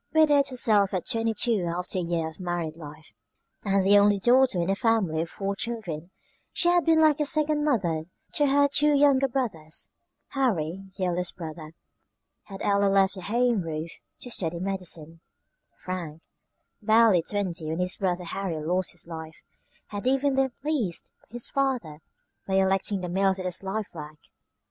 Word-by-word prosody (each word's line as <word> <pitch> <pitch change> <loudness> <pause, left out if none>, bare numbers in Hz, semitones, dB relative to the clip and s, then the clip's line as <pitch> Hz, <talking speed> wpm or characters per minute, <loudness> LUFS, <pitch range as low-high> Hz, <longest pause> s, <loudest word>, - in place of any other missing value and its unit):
Widowed 295 -3 +5
herself 215 -7 +2
at 180 - -2
twenty 225 -2 0
two 215 -2 +1
after 180 +2 -2
a - - 0
year 170 -2 -1
of 160 +2 -11
married 175 -3 -3
life, 150 -6 -12 0.5
and 195 -2 +1
the 205 +1 +7
only 205 0 +4
daughter 245 -2 +4
in 170 - 0
a 195 - +1
family 195 -8 +1
of 165 - -4
four 200 0 -3
children, 190 -8 -5 0.4
she 345 - +1
had 350 -1 +4
been 325 -1 +4
like 310 -1 +4
a 300 - +1
second 305 -1 +2
mother 175 - 0 0.3
to 290 - +2
her 285 +1 +4
two 295 +1 +2
younger 275 -1 +4
brothers. 205 - -3 0.4
Harry, 195 - -1
the 190 - -1
eldest 180 0 -2
brother, 160 -2 -8 0.7
had 195 -1 -8
early 200 0 +3
left 195 -1 +3
the 190 - -7
home 235 +2 +1
roof 160 0 -5 0.3
to 245 - -5
study 170 -5 -2
medicine. 175 -4 -4 0.6
Frank, 170 -4 -6 0.6
barely 220 -4 +5
twenty 180 -4 -3
when 160 - -2
his 180 0 0
brother 180 -2 -1
Harry 175 -2 -4
lost 180 +4 -1
his 175 - -9
life, 160 -1 -9 0.5
had 205 +3 -4
even 270 +1 +2
then 265 -1 +1
pleased 265 - -1 0.2
his 240 +1 -4
father 255 - -1 0.5
by 190 - 0
electing 195 +1 +1
the 180 - -3
mills 190 +1 +2
as 185 - -5
his 180 -1 -3
life 195 +2 -3
work. 155 -2 -9
195 Hz, 170 wpm, -26 LUFS, 170-240 Hz, 0.7 s, the